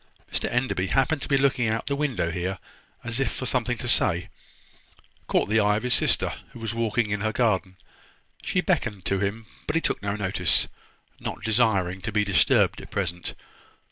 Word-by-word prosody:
Mr - - 0
Enderby, 125 -7 0
happening 135 +7 +2
to - - -4
be 140 - +3
looking 135 -3 +2
out 115 +1 0
of - - -34
the 140 - -1
window 135 - -1
here, 90 +2 -2 0.5
as 120 +1 -2
if 135 - +1
for 130 - -5
something 125 -1 0
to 120 - -5
say, 90 -7 +2 1.0
caught - - +2
the 110 +2 +3
eye 105 -1 +3
of 110 - -4
his 125 0 +2
sister, - - +2 0.2
who - - -10
was 115 0 -3
walking 115 -1 0
in 105 -1 -1
her 110 +1 0
garden. 100 -6 0 0.6
She 180 - 0
beckoned 120 - -1
to 100 - +1
him, 105 +3 -2 0.2
but 150 - -1
he 165 - +3
took - - -1
no 100 0 -2
notice, 90 -4 +2 0.5
not - - -6
desiring 100 -5 +2
to 115 - -3
be 105 0 +2
disturbed 95 -2 +3
at - - -11
present. 90 -3 -3
110 Hz, 195 wpm, -25 LUFS, 95-125 Hz, 1.0 s, be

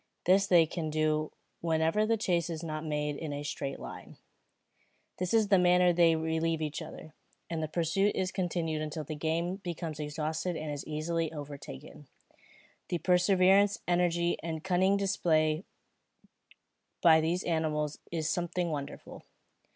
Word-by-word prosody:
This 195 +2 +4
they 175 -4 +6
can 160 0 -4
do 155 0 0 0.3
whenever 165 +5 +1
the 225 0 +2
chase 175 -5 0
is 165 -1 -5
not 155 -1 -4
made 150 -2 -2
in 155 -2 -5
a 145 0 -4
straight 140 -2 -4
line. - - -9 1.0
In 180 - 0
this 220 0 +3
manner 180 -1 +5
they 165 -1 +5
relieve 160 0 0
each 155 +1 -3
other, 155 0 -10 0.4
and 165 -1 -2
the 155 - -1
pursuit 175 +6 +1
is 185 0 -1
continued 170 -4 -2
until 155 0 -4
the 155 - -6
game 165 +4 -1
becomes 170 -5 -5
exhausted 155 +3 -2
and 155 -1 -4
is 145 -1 -5
easily 160 +1 -2
overtaken. 145 - -9 0.8
The 175 - 0
perseverance, 190 +3 +4
energy, 175 -1 +2
and 160 -1 -4
cunning 190 +2 +3
displayed 165 -4 +1 1.4
by 160 -2 +7
these 170 +3 0
animals 155 -3 -1
is 160 -2 -1
something 175 0 -1
wonderful. 145 -1 -6
165 Hz, 145 wpm, -30 LUFS, 155-180 Hz, 1.4 s, by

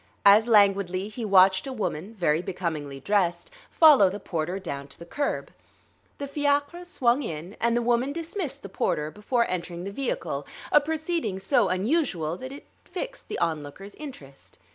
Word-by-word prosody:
As 210 +3 +7
languidly 200 -3 +3
he 230 +2 -6
watched 190 0 +5
a - - -4
woman, 210 -3 -4
very 165 -5 +1
becomingly 160 -7 -4
dressed, 190 - 0 0.2
follow 290 - +7
the 200 +3 -6
porter 175 -1 -3
down 140 -7 -6
to 140 - -11
the 170 - -10
curb. 285 +11 -3 0.7
The 285 - -4
fiacre 285 +4 0
swung 260 -6 +1
in, 170 - -6
and 235 0 +2
the 240 - 0
woman 245 +3 +1
dismissed 335 - -4
the - - -6
porter 155 -5 -1
before 235 +4 0
entering 175 -1 -4
the 200 - -5
vehicle; 200 - -3 0.2
a 295 - +6
proceeding 315 - -2
so 220 +1 +2
unusual 185 - 0
that 260 +4 -8
it 280 - -10 0.2
fixed - - -6
the - - -4
onlooker's 165 +4 -3
interest. 145 - -11
200 Hz, 165 wpm, -26 LUFS, 175-275 Hz, 0.7 s, As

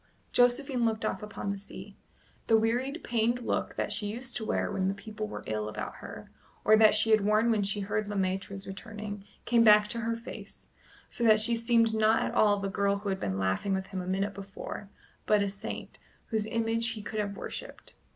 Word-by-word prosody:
Josephine 245 +1 +3
looked 220 -1 0
off 190 - -2
upon 210 -1 -4
the 200 - -4
sea. 200 - -10 0.5
The 225 - +6
wearied 245 +8 0
pained 235 +1 +1
look - - -1
that - - -2
she 210 - -1
used 240 +4 -4
to 220 - -4
wear - - 0
when 190 -2 0
the 195 - 0
people 215 0 -6
were - - -7
ill 105 0 -2
about - - -6
her, - - -10 0.3
or 215 - +7
that 215 -1 +6
she 220 +1 +4
had 215 -1 +6
worn 215 +3 +3
when 215 -2 +2
she 200 +1 0
heard 205 +1 -1
Le 205 - -4
Maître 190 0 -1
was 195 0 -7
returning, 210 0 -7 0.2
came 235 -1 +4
back 210 -1 +7
to 235 - -3
her 230 0 -1
face, 230 +2 -9 0.4
so 240 - -3
that 215 -1 +7
she 235 +2 +3
seemed 230 -1 +3
not 220 0 +3
at - - -2
all 205 -1 +4
the 200 0 -2
girl 200 +1 +1
who 200 0 -4
had 190 0 -1
been 95 -1 -2
laughing 95 - 0
with 190 0 -3
him 185 - -2
a 180 - -7
minute 195 +2 -1
before, 195 0 -8 0.4
but 210 -1 +4
a 200 - -1
saint, 205 +3 -7 0.3
whose 220 -2 -1
image 230 0 0
he 215 -2 -7
could 215 +1 -4
have 200 -1 -2
worshipped. - - -7
215 Hz, 220 wpm, -29 LUFS, 200-225 Hz, 0.5 s, or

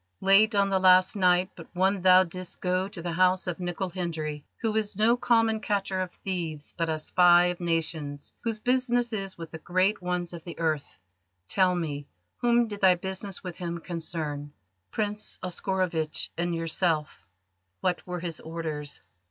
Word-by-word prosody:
"Late 205 +3 +5
on 200 0 +3
the 190 -1 +2
last 185 +1 +5
night 185 -1 +3
but 165 - -11
one 190 +1 +2
thou 185 0 +7
didst 185 0 -7
go 185 +1 0
to 170 -4 -7
the 175 - -2
house 185 +2 +3
of 180 -1 -3
Nicol 180 +1 -3
Hendry, 160 -5 -4 0.2
who 220 -2 -1
is 210 -3 -1
no 225 +3 +4
common 225 -2 +2
catcher 195 -2 -1
of 185 -1 -3
thieves, 165 -7 -4
but 165 -1 -1
a 160 - 0
spy 175 +2 +5
of 180 0 -1
nations 160 -4 -2
whose 225 -2 -1
business 245 -1 +1
is 195 -3 -4
with 165 -2 -8
the 160 - -7
great 185 +5 +1
ones 180 -1 -2
of 170 -2 -8
the 170 - -8
earth. 155 -3 -2 0.5
Tell 185 - +3
me: 145 -4 -3 0.3
whom 240 0 +3
did 205 -2 -7
thy 185 -2 +6
business 190 +2 -5
with 180 -3 -6
him 170 -1 -4
concern?" 155 -4 -5 0.4
"Prince 210 -1 -2
Oscarovitch 180 -3 -1
and 170 0 -1
yourself." 165 -2 -1 0.6
"What 180 0 -1
were 180 -1 -4
his 170 -2 -4
orders?" 155 -3 -5
180 Hz, 170 wpm, -27 LUFS, 165-195 Hz, 0.6 s, thou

